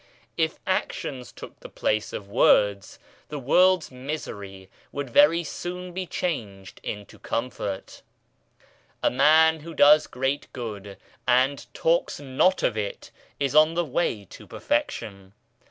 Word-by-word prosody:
If - - 0
actions 125 -2 -3
took - - -12
the - - -11
place 105 0 -1
of 100 - -6
words, 100 -2 +3 0.3
the 150 - -5
world's 180 +6 +3
misery 105 -8 -7 0.2
would 140 -3 -5
very 155 +6 +5
soon 180 +3 -6
be 185 0 -4
changed 105 - -4
into 105 -1 -7
comfort. 110 -5 -4 1.0
A - - +3
man 160 +4 +5
who 165 +2 -10
does 150 +1 +6
great 135 +3 -2
good, 105 -5 -7 0.3
and 130 0 +2
talks 165 +1 +1
not 145 +7 +1
of 115 - +1
it, 105 -2 -5 0.3
is 140 -2 0
on 155 +2 +5
the 175 0 +1
way 125 -8 -1
to - - -12
perfection. 100 -3 -3
135 Hz, 130 wpm, -25 LUFS, 105-160 Hz, 1.0 s, does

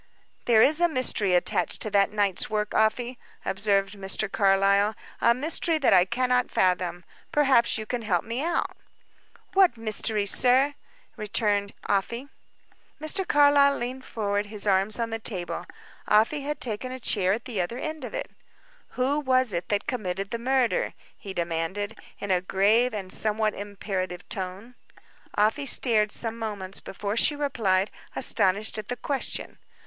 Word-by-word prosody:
"There 225 -2 +5
is 310 +4 +4
a 345 - +6
mystery 230 - +1
attached 175 - 0
to 215 - -3
that 200 0 +3
night's 205 +1 +1
work, 210 -1 -2
Afy," 235 +3 +1 0.3
observed 195 0 +1
Mr. 195 +1 -2
Carlyle; 200 +1 +3 0.3
"a 235 - +4
mystery 320 +4 0
that 280 -8 +3
I 180 -1 +6
cannot 250 +4 +1
fathom. 180 -1 0 0.3
Perhaps 270 -7 +3
you 220 - -5
can 245 +1 -3
help 190 -6 0
me 235 +5 -3
out." 340 +1 -1 0.8
"What 375 -10 +4
mystery, 215 -1 -1
sir?" 255 +7 +3 0.4
returned 210 -1 0
Afy. 235 +7 -1 0.7
Mr. 350 +5 0
Carlyle 285 -1 +5
leaned 255 +2 -5
forward, 205 -3 -2
his 210 -1 -4
arms 195 +1 +3
on 230 -1 -2
the 225 - -3
table. 185 -6 -4 0.4
Afy 225 +8 +3
had 295 +2 -4
taken 245 +2 -3
a 260 - -6
chair 195 -5 +1
at 220 +2 -4
the 220 -7 -2
other 205 +7 -4
end 310 +1 -5
of 245 - -6
it. - - -4 0.7
"Who 270 +4 +1
was 255 -5 +2
it 170 0 -3
that 205 -1 0
committed 195 -5 -3
the 235 - -3
murder?" 255 0 +1 0.2
he 200 - -9
demanded, 175 +5 -3 0.2
in 200 - -4
a 180 -1 +2
grave 210 +7 +2
and 195 -3 -4
somewhat 215 0 +1
imperative 190 -3 -5
tone. 190 +5 -5 0.6
Afy 220 +7 +2
stared 220 -4 +1
some 230 0 -1
moments 200 -4 -4
before 200 +2 -5
she 295 +5 +3
replied, 215 -9 0 0.2
astonished 205 +3 +2
at 210 - -7
the 245 - -4
question. 270 +3 -4
215 Hz, 155 wpm, -26 LUFS, 195-250 Hz, 0.8 s, a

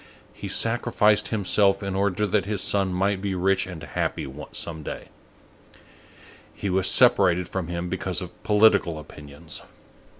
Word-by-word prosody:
He - - -7
sacrificed 115 -2 +2
himself 100 -1 +2
in 100 -1 -3
order 100 +1 0
that 100 0 0
his 105 -3 -1
son 100 -2 +1
might 95 +2 0
be 100 -1 -2
rich 95 +1 +1
and 85 -5 -8
happy 75 - -3 0.2
some 80 -2 -4
day. - - -7 1.4
He 100 - -4
was 95 0 +3
separated 95 -8 +4
from 95 -3 -4
him 85 +1 -4
because 95 0 -3
of 90 -2 -9
political 105 -6 +4
opinions. 75 +1 -9
95 Hz, 140 wpm, -24 LUFS, 90-105 Hz, 1.4 s, separated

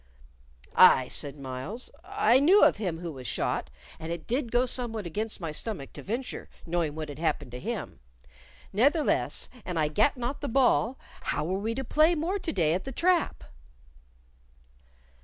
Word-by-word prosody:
"Aye," 130 -1 +7
said 145 0 0
Myles, 135 - -6
"I 400 - +3
knew 360 +9 +6
of - - +5
him 180 -6 -3
who 170 -2 -4
was 130 -4 -8
shot, 65 - -1 0.3
and 160 +1 -5
it 170 -2 -5
did 245 -1 -1
go 245 +1 +3
somewhat 235 -5 -3
against 210 +6 -3
my 165 -4 -4
stomach 155 -3 -5
to - - -8
venture, 240 +6 -4 0.2
knowing 165 -3 -1
what 155 -1 -4
had 145 - -8
happed 160 -6 -1
to 125 - -6
him. - - -5 0.7
Ne'theless, 240 - +2 0.2
an 180 -2 -4
I 155 -1 +2
gat 215 - +2
not 245 +3 -3
the 285 - -2
ball, 255 -1 +3 0.3
how - - -1
were 185 +3 -1
we 225 +3 -2
to 265 - -3
play 310 +7 +4
more 345 +6 -1
to 335 - -2
day 165 -5 +2
at 185 - -1
the 270 - -6
trap?" 345 +4 +1
215 Hz, 175 wpm, -28 LUFS, 160-265 Hz, 0.7 s, Aye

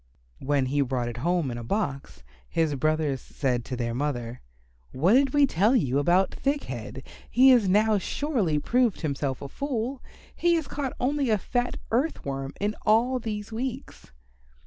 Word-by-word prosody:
When 140 -1 +1
he 140 +3 0
brought 125 -3 -1
it 120 - -7
home 165 0 0
in 120 - -5
a - - -7
box, 135 - -3 0.3
his 160 -2 +1
brothers 155 -1 0
said 125 -4 -2
to 125 - -4
their 120 -1 -2
mother, 125 -3 -3 0.5
"What 170 - +2
did 270 +1 +4
we 290 0 +5
tell 215 +2 +2
you 140 - +2
about 175 +6 +2
Thick 280 +1 -1
head? 130 +1 -7 0.3
He 260 +2 +6
has 240 -7 +5
now 210 +2 +3
surely 215 - -1
proved 240 +6 +1
himself 140 -4 -2
a - - -5
fool. 260 - -3 0.3
He 345 0 +2
has 320 -3 -1
caught 275 -2 -3
only 275 0 0
a 215 - +3
fat 245 +5 -2
Earth 265 +8 0
Worm 135 0 -4
in 210 +1 -1
all 240 +4 +3
these 210 -2 -5
weeks." 250 - -6
185 Hz, 170 wpm, -26 LUFS, -, 0.5 s, He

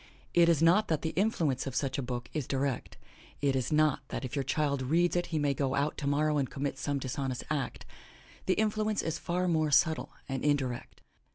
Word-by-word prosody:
It 170 -1 +5
is 165 -2 +3
not 180 +6 +5
that 160 -2 0
the 160 - -1
influence 165 - 0
of 135 - -4
such 135 0 -1
a - - 0
book 125 -1 -4
is 150 -5 -2
direct; 135 -2 -2 0.4
it 140 -2 +1
is 130 +1 -1
not 155 -2 +3
that - - -4
if 125 - -5
your 140 - +1
child 140 0 0
reads 170 +7 +2
it 175 - 0
he 160 - -2
may 145 -2 +2
go 135 0 -1
out 145 +2 0
tomorrow 150 +1 +1
and 135 - -1
commit 140 0 -3
some 145 -1 -1
dishonest 130 -1 -3
act; 145 -3 -2 0.6
the 185 - +3
influence 215 0 0
is 160 0 -2
far 180 +1 -1
more 160 -3 +2
subtle 160 +2 +3 0.2
and 135 -1 -3
indirect. 135 -4 -1
145 Hz, 205 wpm, -30 LUFS, 135-165 Hz, 0.6 s, It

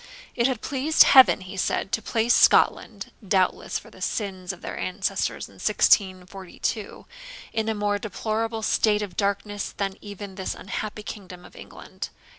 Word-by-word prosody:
It 235 +1 +3
had 255 -4 -2
pleased 285 +3 +4
Heaven, 260 -6 +7
he 185 +2 -9
said, 190 +1 -1
to 230 - 0
place 225 +2 +1
Scotland - - +3
(doubtless - - 0
for - - -12
the - - -16
sins 190 -4 -3
of 180 - -12
their - - -5
ancestors 190 +2 -2
in - - -19
1642) 190 +2 0 0.5
in 220 0 -1
a 220 - -1
more 205 0 0
deplorable 220 +2 -3
state 210 -1 +2
of 190 -4 -7
darkness 200 0 -2
than 195 -1 -2
even 205 -1 -8
this 190 0 -4
unhappy 210 +2 -5
kingdom 185 -4 -9
of - - -16
England. - - -9
205 Hz, 155 wpm, -25 LUFS, 190-220 Hz, 0.5 s, Heaven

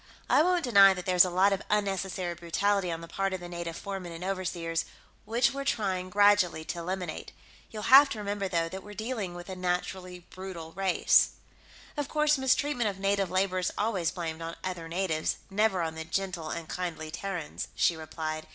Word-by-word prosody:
I - - +6
won't 355 +1 +2
deny 200 -6 +7
that 180 - -6
there's 180 -1 +6
a - - -2
lot 190 +3 +3
of 195 - -2
unnecessary 195 -3 -1
brutality 180 +2 0
on 165 0 -4
the 165 - -9
part 195 +2 -2
of 185 - -3
the 175 - -8
native 170 -1 -5
foremen 195 -3 -6
and 165 +1 -7
overseers, 175 -3 -2 0.4
which 240 +4 +2
we're 275 0 -4
trying, 190 -8 -1
gradually, 205 -4 +4
to 170 - -4
eliminate. 180 -1 -4 0.4
You'll 215 -1 -7
have 275 +2 +8
to 230 - -4
remember, 205 -1 -2
though, 170 -2 0
that 190 +3 -7
we're 210 +1 -11
dealing 220 -5 -4
with 175 0 -9
a 190 - -6
naturally 180 0 -3
brutal 185 -4 -8
race." 190 +1 +3 0.6
"Of 290 -2 -3
course, 300 -2 +2
mistreatment 265 -3 +1
of 195 - -6
native 195 -1 +1
labor 185 0 +1
is 180 - -1
always 200 -6 0
blamed 165 -2 -5
on 165 0 -5
other 180 -3 -4
natives, 165 -3 0 0.2
never 195 -3 +2
on 160 -1 -2
the 160 0 -5
gentle 175 -1 -3
and 165 -1 -5
kindly 160 -3 -4
Terrans," 180 -4 -4
she 170 - +3
replied. 155 0 -5
185 Hz, 190 wpm, -29 LUFS, 170-200 Hz, 0.6 s, have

